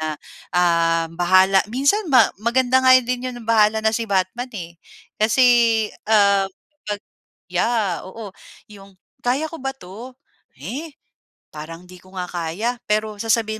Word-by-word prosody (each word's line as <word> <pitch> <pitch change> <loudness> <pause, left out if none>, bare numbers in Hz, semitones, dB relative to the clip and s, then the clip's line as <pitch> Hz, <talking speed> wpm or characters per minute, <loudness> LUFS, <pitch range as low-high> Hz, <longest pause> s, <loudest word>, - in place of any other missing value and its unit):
na, 155 -1 -3 0.4
ah, 165 -1 +2
bahala 185 +3 +4
minsan 280 - +1
ma 250 -5 +5
maganda 245 +4 +2
nga 255 0 +7
din 250 +1 -3
'yon 240 -2 -8
bahala 220 -1 +3
na 220 - +4
si 230 0 -2
Batman, 200 +6 -1
eh. 170 -3 -8 0.4
Kasi, 220 +4 +3 0.6
ah, 200 -2 +4 0.4
pag 205 -1 -3 0.5
yeah! 220 -7 0
Oo, 205 +1 -9 0.4
yung, 195 -1 -15 0.3
"Kaya 280 +6 0
ko 330 - -8
ba 270 0 -4
'to? 235 +4 -11 0.4
Eh, 275 - -7 0.6
parang 165 +3 -9
'di 180 0 -15
ko 185 +1 -19
nga 180 - -3
kaya" 180 +9 -3
pero 215 0 -1
sasabihin 220 -1 0
215 Hz, 140 wpm, -21 LUFS, 185-245 Hz, 0.6 s, nga